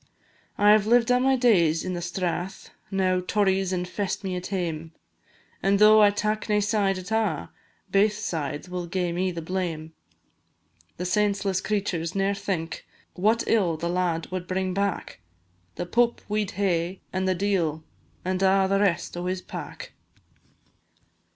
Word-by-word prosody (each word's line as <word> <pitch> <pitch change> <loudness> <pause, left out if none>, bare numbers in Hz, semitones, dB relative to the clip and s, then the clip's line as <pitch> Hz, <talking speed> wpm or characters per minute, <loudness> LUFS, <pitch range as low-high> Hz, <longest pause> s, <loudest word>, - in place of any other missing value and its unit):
I 210 +1 +7
've 215 -1 +1
lived 240 +1 +4
a' 250 - +4
my 265 +1 +3
days 175 -11 +3
in 185 - -2
the 175 - -3
Strath 175 +1 -3 0.2
Now 185 -1 +1
Tories 190 0 +1
infest 185 +3 -2
me 190 -2 -2
at 180 0 -4
hame, 165 -4 -3 0.7
And 195 +1 +3
tho' 215 +1 +7
I 205 - +7
tak 210 +1 -2
nae 210 - +3
side 205 -2 +1
at 185 +2 -8
a', 210 - 0 0.4
Baith 205 +1 +3
sides 160 -7 -3
will 180 -1 -4
gae 180 0 -1
me 185 +2 0
the 170 -2 -5
blame. 165 -3 -3 1.0
The 180 - -3
senseless 195 0 +1
creturs 190 -5 -2
ne'er 195 +1 +1
think 190 -5 -4 0.3
What 215 +5 +2
ill 185 -8 +2
the 170 +2 -3
lad 175 -2 -1
wad 180 -1 -4
bring 185 0 -1
back; 200 - -2 0.5
The 175 - -3
Pope 235 +6 +1
we 210 0 0
'd - - -9
hae, 185 -2 0
and 190 0 0
the 185 - +2
d 200 +2 +1
l, 160 -3 -1 0.4
And 185 0 -1
a' 195 0 +4
the 195 +1 +2
rest 180 -5 0
o' 175 +1 -3
his 185 0 -2
pack. - - -8
190 Hz, 165 wpm, -26 LUFS, 175-205 Hz, 1.0 s, I